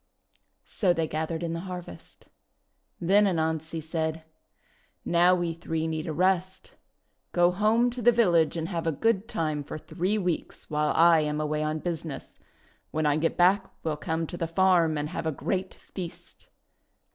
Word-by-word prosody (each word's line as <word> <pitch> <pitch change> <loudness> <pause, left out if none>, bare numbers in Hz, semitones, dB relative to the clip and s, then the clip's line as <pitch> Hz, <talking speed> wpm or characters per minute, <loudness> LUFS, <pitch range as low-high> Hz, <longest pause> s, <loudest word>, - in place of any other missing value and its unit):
So 185 -4 +1
they 165 -2 -1
gathered 160 +2 -3
in 165 -1 -2
the 165 - -3
harvest. 180 - -9 0.7
Then 200 +4 +4
Anansi 160 -2 -1
said: 160 0 -3 0.8
"Now 175 +1 +4
we 175 -2 -1
three 165 -1 -3
need 160 0 -3
a - - -2
rest. 185 +3 0 0.6
Go 175 0 +4
home 220 +6 +2
to 245 +1 -6
the 240 +1 +6
village 175 -9 +3
and 165 0 -2
have 165 -3 -3
a - - +3
good 220 +7 0
time 155 -8 -2
for 145 - -7
three 185 +6 -2
weeks, 180 -6 -3
while 150 0 +1
I 170 0 +6
am 150 0 -1
away 155 0 -1
on 155 0 -1
business. 160 -2 -6 0.5
When 155 0 -1
I 145 -1 +3
get 165 +1 0
back 190 +2 +3
we'll 155 -2 -1
come 160 +2 -2
to 175 - -7
the 165 - -2
farm 170 -2 +3
and 150 +1 -2
have 160 - -4
a - - +1
great 185 +6 -3
feast." 180 -3 -9
165 Hz, 170 wpm, -27 LUFS, 160-185 Hz, 0.8 s, the